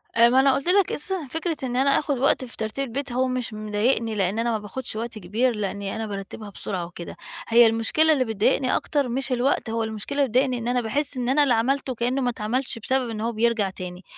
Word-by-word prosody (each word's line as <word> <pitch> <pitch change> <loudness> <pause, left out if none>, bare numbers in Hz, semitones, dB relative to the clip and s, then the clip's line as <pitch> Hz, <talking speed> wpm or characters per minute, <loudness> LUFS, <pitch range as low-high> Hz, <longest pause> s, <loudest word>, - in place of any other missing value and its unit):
آآ، 230 +1 +6
ما 255 +2 +4
أنا 270 0 +5
قُلت 275 - -3
لك 380 +1 +4
أساسًا 355 -1 -2
فكرة 325 0 -2
إن 250 -1 -2
أنا 270 +2 +3
آخد 285 -3 -1
وقت 260 0 +2
في 245 - -10
ترتيب 220 +5 -3
البيت 275 +3 -4
هو 255 +2 +1
مش 255 -3 -3
مضايقني، 215 +2 0
لأن 195 +1 0
أنا 235 +1 +1
ما 225 - +1
باخدش 210 +4 -6
وقت 225 0 -4
كبير، 225 +6 0
لأني 200 -1 -3
أنا 220 0 -3
بارتّبها 205 +1 -7
بسرعة 185 -2 -4
وكده، 170 0 -9 0.3
هي 235 0 +7
المشكلة 230 +8 +3
اللي 265 -4 +1
بتضايقني 230 +4 +1
أكتر 285 -4 0
مش 265 +2 -2
الوقت، 250 -1 +1
هو 225 0 -1
المشكلة 220 +5 -5
اللي 280 - +4
بتضايقني 255 +2 +2
إن 235 0 -4
أنا 245 0 +1
باحس 275 +5 0
إن 245 -1 -1
أنا 290 +3 +4
اللي 265 -4 +3
عملته 255 +3 0
كأنه 245 +4 0
ما 250 - +1
اتعملش، 235 +2 -2
بسبب 260 +1 0
إن 215 -1 -4
هو 230 +1 0
بيرجع 225 -2 +1
تاني، 180 0 -8
240 Hz, 230 wpm, -24 LUFS, 220-265 Hz, 0.3 s, هي